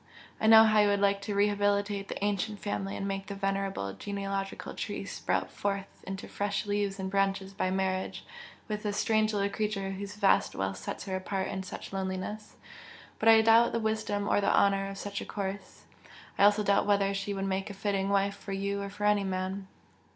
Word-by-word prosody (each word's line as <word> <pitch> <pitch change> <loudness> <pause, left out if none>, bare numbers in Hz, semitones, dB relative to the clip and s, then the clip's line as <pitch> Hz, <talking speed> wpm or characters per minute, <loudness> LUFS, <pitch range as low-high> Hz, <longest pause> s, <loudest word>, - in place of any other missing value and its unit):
I 220 - +1
know 220 0 +10
how 215 -1 +4
you 210 - +5
would 200 0 +2
like 200 0 +2
to 205 0 -3
rehabilitate 205 0 +1
the 200 - -3
ancient 205 +1 -1
family 200 -1 -3
and 195 - -3
make 195 0 -3
the 200 - -5
venerable 195 - -2
genealogical 195 - -4
tree - - -4
sprout - - -2
forth 200 -1 -4
into 195 0 -5
fresh 200 0 -2
leaves 205 -1 -1
and 190 - -2
branches 195 0 0
by 185 - -1
marriage 190 0 -2 0.4
with 210 -1 -3
this 205 -1 -2
strange 215 0 +2
little 200 -1 +1
creature 200 -1 -2
whose 200 +1 -6
vast 205 -2 +3
wealth 95 0 -2
sets - - -6
her 190 -2 -3
apart 190 0 -2
in 190 - -3
such 190 - -8
loneliness, 190 +2 -4 0.6
but 225 - +4
I 220 0 +8
doubt 225 +1 +5
the 230 - +1
wisdom 220 -2 -1
or 205 - +3
the 200 - +2
honour 195 0 +3
of 195 - -7
such 200 0 -4
a - - -6
course 195 -1 -5 0.5
I 200 - +5
also 210 +1 +4
doubt 200 0 +2
whether 200 -1 +3
she 200 +1 -3
would 195 0 -2
make 195 +1 -2
a 200 - -7
fitting 195 -1 -1
wife 200 0 +2
for 195 - -7
you 200 +1 -2
or 200 - -4
for 205 +1 -8
any 210 -1 +3
man!" 190 +1 -3
200 Hz, 200 wpm, -30 LUFS, 195-205 Hz, 0.6 s, know